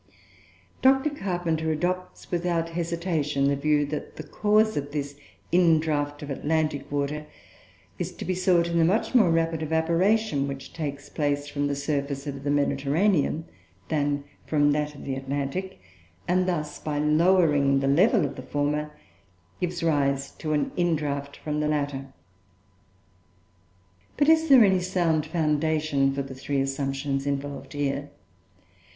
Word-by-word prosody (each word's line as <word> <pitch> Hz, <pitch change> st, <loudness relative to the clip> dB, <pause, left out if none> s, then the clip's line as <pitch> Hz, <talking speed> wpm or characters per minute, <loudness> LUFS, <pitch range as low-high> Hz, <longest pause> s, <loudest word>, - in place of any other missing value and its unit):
Dr. 270 Hz, +3 st, +4 dB
Carpenter 175 Hz, -, -1 dB
adopts, 180 Hz, +4 st, -3 dB
without 170 Hz, -1 st, 0 dB
hesitation, 165 Hz, -4 st, -1 dB
the 140 Hz, -, +2 dB
view 145 Hz, +1 st, +2 dB
that 150 Hz, +1 st, -6 dB
the 155 Hz, -, -7 dB
cause 215 Hz, +6 st, +2 dB
of 145 Hz, 0 st, -3 dB
this 145 Hz, -1 st, -3 dB, 0.4 s
indraught 155 Hz, -4 st, +2 dB
of 145 Hz, -, -6 dB
Atlantic 150 Hz, -1 st, -1 dB
water 145 Hz, +1 st, -2 dB, 0.7 s
is -, -, -3 dB
to -, -, -7 dB
be 185 Hz, -, 0 dB
sought 180 Hz, -2 st, +2 dB
in 170 Hz, 0 st, 0 dB
the -, -, +5 dB
much 195 Hz, +10 st, +1 dB
more 220 Hz, -8 st, +5 dB
rapid 165 Hz, -1 st, +1 dB
evaporation 165 Hz, +1 st, +1 dB
which 135 Hz, -1 st, -7 dB
takes 145 Hz, -3 st, -5 dB
place 145 Hz, -1 st, -1 dB
from 145 Hz, 0 st, -1 dB
the 140 Hz, -, -1 dB
surface 140 Hz, -1 st, -2 dB
of 140 Hz, -1 st, -6 dB
the 145 Hz, -, -1 dB
Mediterranean 145 Hz, +4 st, +1 dB, 0.4 s
than 145 Hz, -2 st, 0 dB, 0.2 s
from 145 Hz, -1 st, +3 dB
that 150 Hz, 0 st, -1 dB
of -, -, -10 dB
the 135 Hz, -, -2 dB
Atlantic; 140 Hz, -, -3 dB, 0.5 s
and 185 Hz, +1 st, +2 dB
thus, 150 Hz, -4 st, -2 dB
by 150 Hz, -1 st, -3 dB
lowering 150 Hz, -3 st, +3 dB
the 135 Hz, -, 0 dB
level 185 Hz, -, +4 dB
of 140 Hz, -, -5 dB
the -, -, -5 dB
former, 145 Hz, +3 st, -1 dB, 0.7 s
gives 175 Hz, -1 st, -2 dB
rise 140 Hz, -3 st, +1 dB
to 155 Hz, -1 st, -4 dB
an 145 Hz, -2 st, 0 dB
indraught 145 Hz, -5 st, -1 dB
from 150 Hz, -1 st, -2 dB
the 150 Hz, -, 0 dB
latter. 140 Hz, -3 st, -2 dB, 2.1 s
But 290 Hz, +1 st, +3 dB
is 320 Hz, 0 st, +4 dB
there 260 Hz, -4 st, +9 dB
any 190 Hz, -2 st, +3 dB
sound 175 Hz, -4 st, 0 dB
foundation 155 Hz, -3 st, +1 dB
for 140 Hz, 0 st, -2 dB
the 135 Hz, 0 st, -8 dB
three 135 Hz, +1 st, -2 dB
assumptions 135 Hz, 0 st, -2 dB
involved 140 Hz, -1 st, -4 dB
here? 145 Hz, 0 st, -2 dB
150 Hz, 145 wpm, -26 LUFS, 140-170 Hz, 2.1 s, there